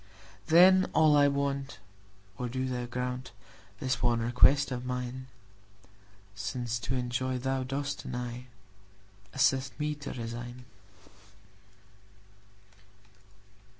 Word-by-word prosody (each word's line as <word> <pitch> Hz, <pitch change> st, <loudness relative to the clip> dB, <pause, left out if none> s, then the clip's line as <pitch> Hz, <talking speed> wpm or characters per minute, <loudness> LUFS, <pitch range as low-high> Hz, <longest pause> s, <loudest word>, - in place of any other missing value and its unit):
Then 185 Hz, +3 st, +6 dB
all 155 Hz, -2 st, +6 dB
I 145 Hz, -1 st, +6 dB
want—O 100 Hz, -7 st, -5 dB
do 130 Hz, +2 st, -2 dB
Thou 125 Hz, -1 st, -3 dB
grantThis 125 Hz, +1 st, -5 dB
one 120 Hz, -1 st, +2 dB
request 125 Hz, +5 st, +4 dB
of 125 Hz, -1 st, -3 dB
mine!—Since 100 Hz, -3 st, -7 dB
to 130 Hz, +2 st, -3 dB
enjoy 125 Hz, +1 st, -1 dB
Thou 130 Hz, +1 st, -1 dB
dost 140 Hz, +2 st, -3 dB
deny, 125 Hz, 0 st, -5 dB, 0.8 s
Assist 130 Hz, +2 st, +1 dB
me 150 Hz, 0 st, 0 dB
to 145 Hz, -1 st, -7 dB
resign. 120 Hz, +1 st, -7 dB
125 Hz, 85 wpm, -30 LUFS, 115-135 Hz, 0.8 s, Then